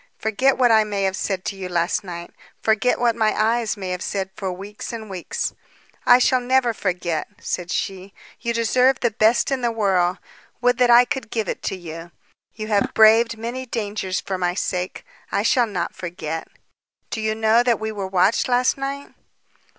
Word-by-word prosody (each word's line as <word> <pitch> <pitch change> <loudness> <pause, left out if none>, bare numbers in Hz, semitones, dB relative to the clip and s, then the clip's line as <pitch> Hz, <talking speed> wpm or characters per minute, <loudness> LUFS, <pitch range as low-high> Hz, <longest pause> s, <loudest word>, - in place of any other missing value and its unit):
Forget 255 +5 +1
what 245 -2 +4
I 220 -1 +6
may 205 -2 -2
have 190 -1 0
said 190 -2 -3
to 200 - -3
you 190 -1 -6
last 175 +1 0
night, 175 -2 -7 0.3
forget 225 +3 +2
what 235 -2 +2
my 220 -2 +1
eyes 225 0 +1
may 190 -2 -5
have 180 0 -3
said 190 -1 -3
for 190 -2 -3
weeks 200 +3 -7
and 220 -3 -7
weeks." 180 -3 -3 0.5
"I 245 - +9
shall 255 0 +3
never 250 -1 +2
forget," 180 -5 -2
said 175 -1 -4
she. 195 0 -3 0.3
"You 235 - -2
deserve 250 +3 +2
the 240 - +2
best 220 +5 +2
in 265 -1 0
the 240 - +1
world. 190 -5 +1 0.4
Would 245 0 +2
that 250 -1 +4
I 240 +1 +8
could 260 -2 -4
give 220 -3 -2
it - - -4
to - - -4
you. 165 -1 -8 0.5
You 215 - -5
have 205 -2 +1
braved 225 +1 +5
many 240 +3 -5
dangers 205 -5 -3
for 190 -1 -4
my 175 0 0
sake. 180 -2 -3 0.3
I 200 - +1
shall 240 +1 +3
not 180 -5 -3
forget. 165 -2 -5 0.6
Do 220 - -3
you 215 0 0
know 220 +1 +4
that 240 -2 +1
we 220 0 -3
were 200 -3 -4
watched 190 +3 +2
last 250 +2 +2
night?" 275 +1 -5
215 Hz, 190 wpm, -22 LUFS, 185-235 Hz, 0.6 s, I